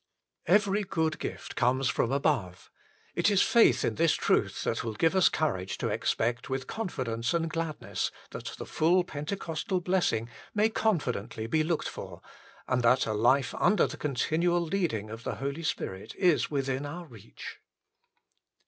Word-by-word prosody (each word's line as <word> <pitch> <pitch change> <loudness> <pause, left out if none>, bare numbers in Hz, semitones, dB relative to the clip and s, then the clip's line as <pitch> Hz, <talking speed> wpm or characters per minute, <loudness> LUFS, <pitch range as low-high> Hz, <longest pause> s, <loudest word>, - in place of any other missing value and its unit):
Every 205 +3 +3
good 160 -5 -1
gift - - -6
comes 130 +2 +2
from 115 +4 +1
above: 130 - -1 0.4
it - - +3
is 200 -2 +4
faith 235 - +4
in 115 - 0
this 160 +4 +3
truth - - +1
that - - -1
\vill 115 -1 -3
give 165 - +2
us 190 - +6
courage 95 -12 -1
to - - -2
expect 120 +3 -1
with 130 0 -2
confidence 125 - -2
and 165 -1 +1
gladness 165 -1 -3 0.2
that - - -7
the - - -6
full 175 +3 +3
Pentecostal 165 +3 -3
blessing 175 -11 +1 0.3
may 210 +1 +4
con 220 -3 +2
fidently 115 -4 -4
be 155 +6 +2
looked 165 0 -1
for, - - -8 0.5
and 130 -1 +1
that 125 +2 +4
a 110 - -1
life 120 +4 +3
under 210 - +3
the - - -5
continual 160 +5 +1
leading 160 - -1
of 115 +1 -8
the - - -3
Holy 140 +4 -4
Spirit 95 -11 -4
is 180 -5 +3
within 135 -1 -1
our 170 +5 -6
reach. 115 - -11
150 Hz, 160 wpm, -29 LUFS, 120-175 Hz, 0.5 s, us